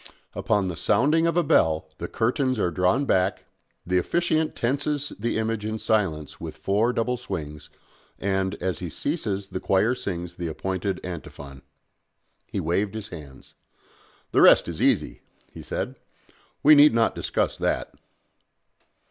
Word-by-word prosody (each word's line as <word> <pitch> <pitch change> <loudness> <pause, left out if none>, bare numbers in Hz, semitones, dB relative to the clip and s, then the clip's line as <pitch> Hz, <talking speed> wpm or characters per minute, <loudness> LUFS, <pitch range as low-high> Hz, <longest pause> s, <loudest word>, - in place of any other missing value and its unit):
Upon 105 -3 0
the 90 - -3
sounding 155 - +2
of 170 0 0
a 175 - +4
bell 80 - +2
the 85 - -4
curtains 130 +4 0
are 90 -4 0
drawn 90 - +2
back, 95 -4 +1 0.4
the 90 +1 +2
officiant 160 - 0
tenses 145 +4 -1
the 115 +2 -1
image 110 -1 -1
in 110 +1 -3
silence 95 -10 -1
with - - -7
four 105 +5 +1
double 125 +1 -1
swings, 75 -10 -6 0.5
and, 95 0 -1
as 90 -3 -3
he 90 - -5
ceases 100 - -2
the 95 - -4
choir 100 +7 +2
sings 90 -8 -5
the 85 - -3
appointed 95 +4 -3
antiphon." 70 -6 -8 0.9
He - - -3
waved 95 +6 -1
his 110 -1 -5
hands. 75 -6 -11 0.8
"The - - +4
rest - - +7
is - - -5
easy," - - +1 0.3
he - - -9
said. - - -4 0.7
"We 150 - +8
need 145 -3 +7
not 115 -1 +3
discuss - - -1
that." - - -1
100 Hz, 150 wpm, -25 LUFS, 90-125 Hz, 0.9 s, We